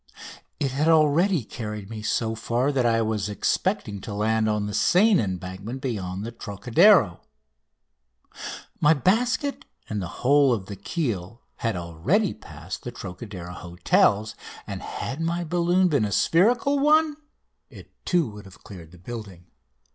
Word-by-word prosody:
It 140 -3 0
had 145 +4 0
already 160 - +4
carried 105 -3 -6
me 110 -1 -6
so 110 +1 -1
far 120 +5 0
that 130 -4 +1
I 115 -1 +2
was 105 -2 -1
expecting 100 0 -1
to 100 - -6
land 110 +1 +1
on 105 -1 0
the 105 - -4
Seine 195 - +4
embankment 95 +5 -5
beyond 100 -7 -4
the 115 - -5
Trocadero. 120 - +3 1.6
My 150 +2 +5
basket 245 - +1 0.2
and 105 -2 -3
the 90 - -4 0.2
whole 140 0 +5
of 100 -5 -3
the 100 - -7
keel 115 - -4
had 115 -3 -1
already 90 - 0
passed 80 +4 -9
the 120 - -6
Trocadero 95 -4 -8
hotels, 90 +4 +1 0.3
and - - -6
had 140 +5 -5
my 170 +1 -1
balloon 175 +2 +2
been 145 -10 +2
a 105 - -3
spherical 235 - +3
one, 305 +1 +3 0.5
it - - -14
too 175 -5 +1
would 105 -1 -11
have 95 -3 -16
cleared 90 -5 -11
the 90 - -16
building. 95 -3 -9
115 Hz, 145 wpm, -25 LUFS, 100-165 Hz, 1.6 s, My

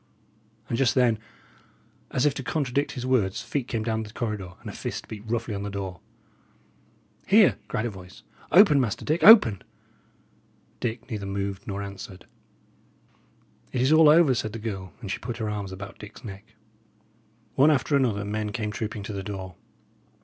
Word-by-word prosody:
And 115 - -2
just 130 -3 +3
then, 120 -4 +3 0.9
as 130 - 0
if 145 - +3
to 135 - -5
contradict 140 +1 -1
his 125 -1 -5
words, 115 -7 +1
feet 135 -4 -3
came 115 -3 -2
down 110 0 -1
the 105 -1 -8
corridor, 105 -6 -4
and - - -12
a - - -6
fist - - -5
beat 105 -2 -8
roughly 115 -1 -2
on 100 - -4
the 100 - -4
door. 95 -3 -5 1.3
"Here!" - - +5
cried 110 - -2
a 120 - -2
voice. 95 -1 -13 0.3
"Open, 170 -7 +7
Master 115 -5 -2
Dick; 155 +3 0
open!" 160 - +8 1.2
Dick 115 0 -4
neither 105 -3 -4
moved 100 0 -4
nor 100 -1 -3
answered. 100 -1 -9 1.5
"It 125 - -1
is 130 +4 +4
all 155 -1 +7
over," 155 -3 +6
said 110 -3 -3
the - - -4
girl; 100 -5 -5
and 100 -5 -5
she 105 - -3
put 120 0 -5
her 110 -3 -2
arms 100 -2 -4
about 100 +2 -9
Dick's 105 +1 -11
neck. 105 +1 -10 1.0
One 140 +3 +5
after 145 0 +2
another, 115 -7 +1
men 105 0 -3
came 105 -1 -3
trooping 105 -1 -4
to 105 - -6
the 100 - -4
door. 95 -2 -6
110 Hz, 175 wpm, -26 LUFS, 100-125 Hz, 1.5 s, open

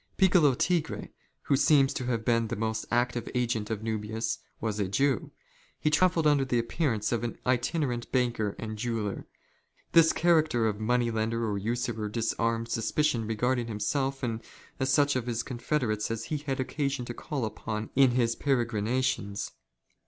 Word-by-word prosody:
Piccolo 175 -8 +5
Tigre, 165 +2 0 0.3
who 140 - +2
seems 135 -1 +4
to 130 - -3
have 115 -3 -1
been 115 -1 +2
the - - -3
most 110 +1 -2
active 120 0 0
agent 120 -4 0
of 110 -2 -3
JSfuhius, 110 0 -2 0.2
was 110 -2 -2
a 100 - +1
Jew. 135 +4 +1 0.5
He 150 - +1
travelled 170 +1 +3
under 145 -2 +4
the 125 -2 0
appearance 115 -2 0
of 120 - 0
aif 120 -1 -4
itinerant 125 0 0
banker 120 -5 0
and 110 -1 -6
jeweller. 110 -4 -3 0.6
This 165 -1 +6
character 155 -8 +3
of 105 -1 -2
money 120 +2 +1
lender. 115 +1 -1
or 100 -1 -1
usurer 115 0 -2
disarmed 115 +1 -1
suspicion 115 0 0
regarding 120 +2 0
himself 135 +6 -1
and 115 -2 -2 0.4
such 145 +2 +3
ot 125 -2 -1
his 115 -1 -1
confederates 120 -4 -1
as 115 -1 -3
he 155 - -2
had 135 -2 -3
occasion 140 -1 -2
to 120 - -5
call 135 -1 -3
upon 110 0 -4
in 135 -1 +6
his 120 -1 +1
peregrina 120 -2 0
tions. 100 -5 -2
120 Hz, 160 wpm, -29 LUFS, 110-135 Hz, 0.6 s, This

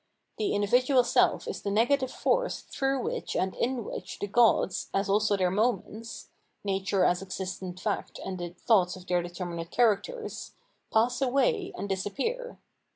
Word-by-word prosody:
The 210 - +1
individual* 250 +6 +4
seH 245 - +2
is 455 - -4
the 200 - -2
negative 255 +6 +2
force - - 0
through 270 -2 -1
which - - -3
and 190 0 0
in 245 -1 -1
which - - -6
the - - -3
gods, 215 -3 +3
as 195 0 +1
also 205 +1 +2
their 185 -2 +2
moments, 225 +1 -2 0.3
(nature 195 -1 +1
as 180 +1 +2
existent 185 -1 -5
fact 205 +1 -3
and 185 -1 -4
the 175 0 -4
thoughts 180 0 +2
of 185 -1 -12
their 180 -1 +1
determinate 175 -1 -5
characters), 245 - 0 0.4
pass 240 +4 +2
away 365 - +2
and - - -4
disappear. 280 - -3
205 Hz, 155 wpm, -28 LUFS, 190-250 Hz, 0.4 s, individual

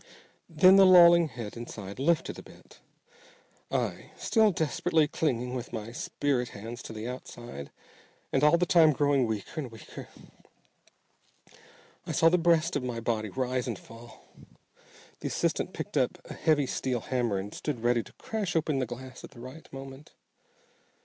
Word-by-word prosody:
Then 185 +4 +6
the 195 - +8
lolling 170 -2 +8
head 120 -7 -8
inside 105 -3 -8
lifted 165 +4 +1
a - - -7
bit. - - -17 0.9
I - - -2
still 220 -2 +3
desperately 160 -1 +1
clinging 125 -6 -1
with 125 -2 -5
my 110 +1 -5
spirit 125 0 -1
hands 115 +4 -7
to - - -9
the 110 +1 -6
outside, 120 - -8 0.6
and 135 - +2
all 150 +3 +6
the 180 - +2
time 160 -3 +5
growing 140 -3 +2
weaker 110 +7 -4
and 130 -5 -7
weaker 115 - -10 2.0
I - - -2
saw 165 - +5
the 180 +2 +3
breast 170 0 +2
of 145 - 0
my 125 -2 -4
body 110 -2 -2
rise 130 +2 -2
and 115 -5 -3
fall. 115 +3 -14 0.9
The - - -4
assistant - - -1
picked - - -6
up - - +1
a - - -8
heavy 150 -3 +2
steel 125 -2 -2
hammer 120 -5 -1
and 100 +2 -5
stood 145 -7 -4
ready 120 0 +3
to - - -15
crash 210 -6 -4
open 155 -3 +1
the 130 - -1
glass 130 +2 -9
at - - -9
the 135 - -15
right 130 +6 -11
moment. 135 +1 -10
130 Hz, 165 wpm, -29 LUFS, 120-160 Hz, 2.0 s, the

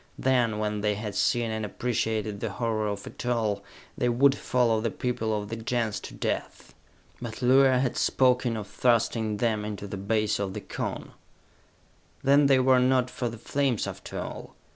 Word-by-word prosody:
Then, 125 -4 +2
when 105 -1 -2
they 105 0 +1
had 105 0 -5
seen 120 -2 +1
and 110 0 -3
appreciated 110 -2 -2
the - - -2
horror 110 -3 -1
of 100 -1 -4
it - - -8
all, 110 -5 0 0.3
they 125 - +1
would 135 +3 +4
follow 120 -5 +1
the 115 - 0
people 110 -1 -2
of 105 0 -7
the 115 - -3
Gens 115 -1 -1
to - - -9
death! - - -4 0.5
But 115 +1 -6
Luar 130 +1 +5
had 130 - -1
spoken 125 -2 +2
of 105 - -5
thrusting 115 -2 +1
them 110 -2 0
into 105 -1 -5
the 100 0 -6
base 105 +2 0
of 95 -2 -3
the - - -4
Cone! - - -5 1.1
Then 140 +1 +5
they 135 -1 +5
were 130 0 +4
not 125 0 +2
for 120 -1 -2
the 115 - -8
flames 135 +1 0
after - - -6
all! - - -7
115 Hz, 180 wpm, -27 LUFS, 105-125 Hz, 1.1 s, Luar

